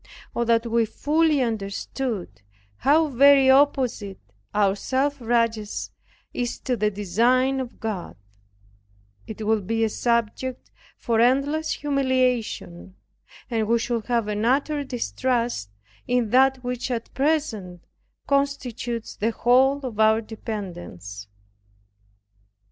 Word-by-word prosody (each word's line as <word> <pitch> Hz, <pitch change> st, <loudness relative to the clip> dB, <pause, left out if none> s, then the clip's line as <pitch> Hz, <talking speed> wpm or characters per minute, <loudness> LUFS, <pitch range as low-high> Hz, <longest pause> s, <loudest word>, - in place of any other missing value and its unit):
Oh, 235 Hz, -, +1 dB
that 230 Hz, 0 st, +2 dB
we 230 Hz, 0 st, +2 dB
fully 305 Hz, +3 st, +1 dB
understood 220 Hz, -, -4 dB, 0.4 s
how 310 Hz, +4 st, +4 dB
very 275 Hz, 0 st, +6 dB
opposite 260 Hz, -8 st, +2 dB, 0.3 s
our 200 Hz, -2 st, +2 dB
self 270 Hz, +5 st, -1 dB
righteousness 230 Hz, -2 st, -1 dB, 0.4 s
is 245 Hz, -1 st, -3 dB
to 255 Hz, -, -1 dB
the 210 Hz, -2 st, +1 dB
designs 240 Hz, +7 st, +1 dB
of 245 Hz, -2 st, -8 dB
God 205 Hz, -, -4 dB, 1.1 s
it 220 Hz, 0 st, -6 dB
would 215 Hz, -3 st, +1 dB
be 225 Hz, 0 st, 0 dB
a 220 Hz, -, +2 dB
subject 235 Hz, +3 st, -2 dB, 0.3 s
for 230 Hz, -2 st, 0 dB
endless 275 Hz, +6 st, +2 dB
humiliation, 255 Hz, -10 st, -1 dB, 0.6 s
and 220 Hz, -2 st, 0 dB
we 235 Hz, +1 st, +3 dB
should 230 Hz, -1 st, -2 dB
have 235 Hz, -3 st, 0 dB
an 210 Hz, 0 st, -2 dB
utter 285 Hz, +4 st, +1 dB
distrust 245 Hz, -, -2 dB, 0.4 s
in 245 Hz, -3 st, +1 dB
that 260 Hz, 0 st, +4 dB
which 250 Hz, +1 st, -3 dB
at 235 Hz, -2 st, -4 dB
present 255 Hz, -, -1 dB, 0.4 s
constitutes 255 Hz, -5 st, -2 dB
the 220 Hz, -, 0 dB
whole 260 Hz, +4 st, +3 dB
of 225 Hz, -4 st, -6 dB
our 220 Hz, 0 st, +5 dB
dependence. 175 Hz, -, -7 dB
235 Hz, 115 wpm, -24 LUFS, 215-265 Hz, 1.1 s, very